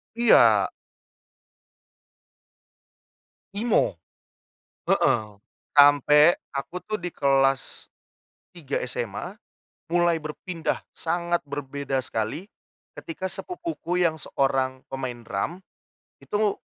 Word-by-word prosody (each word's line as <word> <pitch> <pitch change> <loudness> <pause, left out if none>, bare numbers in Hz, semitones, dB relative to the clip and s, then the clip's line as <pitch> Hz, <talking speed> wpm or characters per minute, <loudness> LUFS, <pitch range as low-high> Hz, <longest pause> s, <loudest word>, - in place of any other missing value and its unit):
Iya. 235 0 +5 2.8
Emo, 205 - +1 0.9
heeh. 110 -2 +3 0.5
Sampai 145 +3 +7 0.2
aku 145 +6 -5
tuh 215 0 -3
di 175 -1 -6
kelas 135 -1 +1 0.7
3 145 -5 -6
SMA, 125 - -4 0.5
mulai 175 -1 +3
berpindah 160 +2 -4 0.2
sangat 170 0 -1
berbeda 140 -1 -3
sekali 130 - -3 0.5
ketika 290 - -5
sepupuku 325 - -3
yang 165 -2 +2
seorang 135 -3 0
pemain 130 -3 -5
drum, 140 - -3 0.6
itu 210 -1 -1
150 Hz, 80 wpm, -25 LUFS, 135-180 Hz, 2.8 s, Sampai